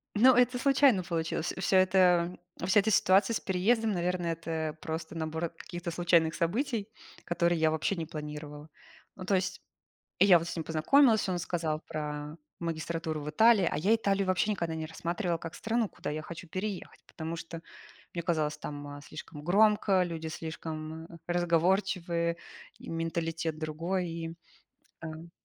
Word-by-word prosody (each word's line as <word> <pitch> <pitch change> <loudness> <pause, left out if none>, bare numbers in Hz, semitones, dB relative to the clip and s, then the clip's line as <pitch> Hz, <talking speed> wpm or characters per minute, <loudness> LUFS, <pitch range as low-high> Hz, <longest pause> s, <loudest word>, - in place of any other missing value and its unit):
Ну, 255 +5 +7
это 250 0 +4
случайно 270 -6 +4
получилось. 165 -1 -2
Вс 190 - -4
всё 190 - +4
это, 185 -2 +4 0.3
вся 190 +3 +5
эта 215 +2 +1
ситуация 195 +3 +4
с - - 0
переездом, 215 +4 +1
наверное, 180 -2 -1
это 160 -2 -3
просто 160 -1 -5
набор 160 +1 -2
каких-то 175 +1 -7
случайных 170 -1 +3
событий, 215 - -1 0.4
которые 170 0 +1
я 160 0 +4
вообще 160 +5 0
не 165 -3 -3
планировала. 150 -1 -7 0.5
Ну 185 - -8
то 195 - +2
есть, 185 0 -1 0.6
я 195 -3 +8
вот 165 0 -4
с - - -4
ним 165 - -3
познакомилась, 220 - +4
он 180 -1 -1
сказал 160 -3 -2
про 150 0 -5 0.2
магистратуру 165 -1 -3
в 150 - -4
Италии, 215 +3 +5
а - - -1
я 195 +9 +3
Италию 200 -3 0
вообще 185 +3 +2
никогда 170 -5 -2
не 160 0 -3
рассматривала 170 +2 -2
как 165 0 -8
страну, 230 0 0
куда 145 - -5
я 155 +1 -3
хочу 170 +3 -9
переехать, 190 +3 -5
потому 160 +1 -5
что 165 0 -7 0.5
мне 170 - -2
казалось, 155 -3 0
там, 145 -1 -6
а, 145 0 -8
слишком 150 0 -9
громко, 200 +1 +4
люди 165 -2 -4
слишком 160 0 -6 0.2
разговорчивые 175 0 +1 0.4
и - - -11
менталитет 165 -1 -2
другой, 165 +4 -2
и 165 0 -5 0.7
ам 165 +1 -8
170 Hz, 160 wpm, -30 LUFS, 160-190 Hz, 0.7 s, я